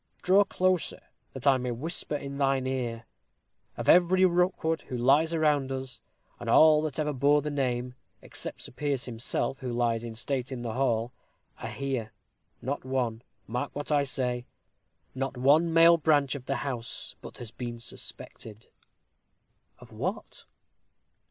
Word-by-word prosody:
"Draw 195 Hz, +3 st, +5 dB
closer, 185 Hz, -3 st, 0 dB, 0.3 s
that 135 Hz, 0 st, -7 dB
I 135 Hz, -2 st, +6 dB
may 125 Hz, 0 st, -3 dB
whisper 150 Hz, +5 st, -3 dB
in 140 Hz, -1 st, -5 dB
thine 135 Hz, -1 st, +2 dB
ear. 120 Hz, -3 st, -3 dB, 0.7 s
Of -, -, -4 dB
every 180 Hz, +1 st, +6 dB
Rookwood 175 Hz, -2 st, +1 dB
who 125 Hz, -, -3 dB
lies 140 Hz, +7 st, +4 dB
around 150 Hz, -4 st, +2 dB
us 130 Hz, -2 st, -6 dB, 0.4 s
and 120 Hz, -, -5 dB
all 155 Hz, +4 st, +7 dB
that 155 Hz, -2 st, -3 dB
ever 150 Hz, -1 st, 0 dB
bore 145 Hz, +2 st, +3 dB
the 150 Hz, -, -2 dB
name, 125 Hz, -3 st, -1 dB, 0.3 s
except -, -, -7 dB
Sir -, -, -7 dB
Piers 140 Hz, -1 st, -2 dB
himself 120 Hz, +3 st, -2 dB
who 125 Hz, -2 st, -4 dB
lies 120 Hz, -1 st, 0 dB
in 115 Hz, -1 st, -6 dB
state 130 Hz, +2 st, -2 dB
at 125 Hz, -2 st, -5 dB
the 115 Hz, -2 st, -3 dB
hall, 120 Hz, -2 st, 0 dB, 0.5 s
are -, -, -5 dB
here 130 Hz, -5 st, -3 dB, 0.5 s
not 140 Hz, +3 st, -3 dB
one 125 Hz, -4 st, -1 dB, 0.2 s
mark 125 Hz, +5 st, -4 dB
what 145 Hz, +1 st, -4 dB
I 145 Hz, -1 st, +4 dB
say 125 Hz, -3 st, -2 dB, 0.7 s
not 135 Hz, 0 st, -3 dB
one 150 Hz, +6 st, +4 dB
male 165 Hz, +1 st, +7 dB
branch 145 Hz, -4 st, +2 dB
of 140 Hz, -3 st, -7 dB
the 135 Hz, -, 0 dB
house 120 Hz, -4 st, -4 dB
but -, -, -10 dB
has 120 Hz, -3 st, -8 dB
been 120 Hz, 0 st, -6 dB
suspected 110 Hz, -1 st, -7 dB, 0.5 s
" -, -, -47 dB
"Of -, -, -14 dB
what?" -, -, -5 dB
135 Hz, 160 wpm, -28 LUFS, 120-150 Hz, 0.7 s, all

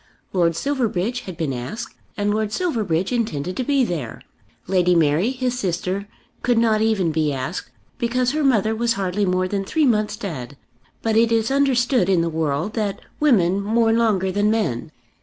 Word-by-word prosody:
Lord 170 Hz, -3 st, +2 dB
Silverbridge 240 Hz, -, -1 dB
had 180 Hz, -3 st, -7 dB
been 155 Hz, -5 st, -1 dB
asked, 130 Hz, -, -6 dB, 0.2 s
and 205 Hz, 0 st, +1 dB
Lord 215 Hz, -1 st, -1 dB
Silverbridge 215 Hz, -, -1 dB
intended 185 Hz, -, -2 dB
to 255 Hz, -, -1 dB
be 275 Hz, 0 st, +2 dB
there. 160 Hz, -, -4 dB, 0.4 s
Lady 180 Hz, -1 st, +2 dB
Mary, 165 Hz, +6 st, +3 dB
his 250 Hz, -1 st, -2 dB
sister, 185 Hz, +1 st, -2 dB, 0.3 s
could 245 Hz, -1 st, +2 dB
not 220 Hz, -2 st, +3 dB
even 210 Hz, -7 st, +2 dB
be 155 Hz, -1 st, +1 dB
asked, 135 Hz, +6 st, -4 dB, 0.3 s
because 250 Hz, +1 st, +1 dB
her 305 Hz, +1 st, -1 dB
mother 220 Hz, -5 st, +3 dB
was 235 Hz, +1 st, +1 dB
hardly 195 Hz, +1 st, -1 dB
more 185 Hz, 0 st, +1 dB
than 195 Hz, +1 st, -2 dB
three 310 Hz, +10 st, +1 dB
months 215 Hz, -4 st, +1 dB
dead; 140 Hz, -, -6 dB, 0.5 s
but 225 Hz, -1 st, +1 dB
it 230 Hz, +1 st, +4 dB
is 225 Hz, +2 st, +1 dB
understood 260 Hz, -6 st, +2 dB
in 185 Hz, -3 st, +3 dB
the 165 Hz, -, 0 dB
world 160 Hz, +4 st, -1 dB
that 210 Hz, -3 st, -2 dB, 0.2 s
women 200 Hz, -, +3 dB
mourn 225 Hz, +2 st, +2 dB
longer 205 Hz, -5 st, +2 dB
than 205 Hz, +2 st, +1 dB
men. 165 Hz, -, -1 dB
205 Hz, 175 wpm, -22 LUFS, 175-235 Hz, 0.5 s, it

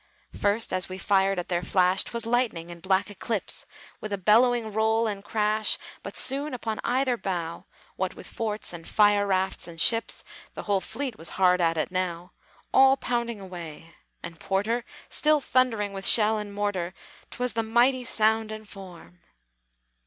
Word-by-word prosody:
First, 205 Hz, +2 st, 0 dB
as 185 Hz, 0 st, 0 dB
we 185 Hz, -, -6 dB
fired 195 Hz, 0 st, +2 dB
at 180 Hz, -, -3 dB
their 175 Hz, -1 st, -1 dB
flash, 185 Hz, +1 st, +3 dB
'Twas 235 Hz, -1 st, -5 dB
lightning 230 Hz, -8 st, 0 dB
and 170 Hz, -1 st, -11 dB
black 190 Hz, +3 st, +1 dB
eclipse, 205 Hz, +1 st, -4 dB, 0.3 s
With 215 Hz, -, -6 dB
a 200 Hz, -, -1 dB
bellowing 225 Hz, +3 st, +3 dB
roll 220 Hz, +2 st, +2 dB
and 200 Hz, -2 st, -3 dB
crash. 215 Hz, 0 st, 0 dB, 0.2 s
But -, -, -4 dB
soon, 280 Hz, +1 st, +3 dB
upon 225 Hz, -3 st, -4 dB
either 255 Hz, 0 st, +1 dB
bow, 175 Hz, -5 st, -4 dB, 0.3 s
What -, -, -2 dB
with -, -, -10 dB
forts 215 Hz, -4 st, -4 dB
and 165 Hz, -1 st, -9 dB
fire 205 Hz, -1 st, +4 dB
rafts 190 Hz, -2 st, -1 dB
and 165 Hz, -1 st, -10 dB
ships 230 Hz, +6 st, +2 dB, 0.3 s
(The -, -, -6 dB
whole 200 Hz, -2 st, +1 dB
fleet 255 Hz, +4 st, -5 dB
was 165 Hz, -, -4 dB
hard 180 Hz, -1 st, +4 dB
at 165 Hz, -1 st, +2 dB
it 155 Hz, -, -1 dB
now), 180 Hz, -1 st, -3 dB, 0.4 s
All 270 Hz, 0 st, +6 dB
pounding 235 Hz, -4 st, -2 dB
away! 170 Hz, -4 st, -9 dB, 0.3 s
and 165 Hz, -1 st, -8 dB
Porter 220 Hz, +7 st, -1 dB, 0.2 s
Still 305 Hz, 0 st, +3 dB
thundering 230 Hz, -7 st, +1 dB
with 195 Hz, 0 st, 0 dB
shell 220 Hz, -1 st, +5 dB
and 210 Hz, -1 st, -6 dB
mortar, 200 Hz, -3 st, -2 dB, 0.3 s
'T -, -, -11 dB
was 250 Hz, 0 st, -1 dB
the 230 Hz, -, 0 dB
mighty 240 Hz, +3 st, +2 dB
sound 220 Hz, -1 st, +1 dB
and 215 Hz, 0 st, -8 dB
form! 180 Hz, -3 st, -12 dB
205 Hz, 170 wpm, -26 LUFS, 185-230 Hz, 0.4 s, All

